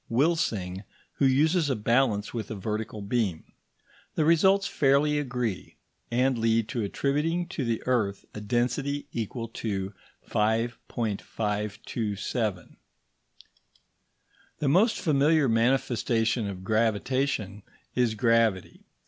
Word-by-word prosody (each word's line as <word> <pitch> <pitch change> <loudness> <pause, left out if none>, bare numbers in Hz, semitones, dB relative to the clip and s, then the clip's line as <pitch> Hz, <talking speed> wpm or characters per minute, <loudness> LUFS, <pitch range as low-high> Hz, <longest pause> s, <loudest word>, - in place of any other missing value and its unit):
Wilsing, 115 - 0 0.3
who 140 - +4
uses 155 +4 +3
a 135 - +1
balance 110 -1 +1
with 115 -2 -4
a 110 - -4
vertical 105 +2 -4
beam. 100 -6 -1 0.7
The 155 - +2
results 190 +5 +4
fairly 145 +1 +2
agree, 125 -8 -3 0.3
and 125 +1 +1
lead 115 -1 +2
to 120 - -2
attributing 150 - 0
to 140 - -3
the 115 -2 -1
earth 110 -6 0
a 105 - -7
density 125 +6 -1
equal 115 +1 -3
to 100 -4 -3 0.3
5.527. 105 -2 -2 1.8
The 150 - -1
most 195 - +4
familiar 150 -2 +3
manifestation 115 -1 +1
of 95 -2 -6
gravitation 110 0 0 0.3
is 120 -3 +1
gravity. 115 -4 +1
115 Hz, 105 wpm, -27 LUFS, 105-135 Hz, 1.8 s, who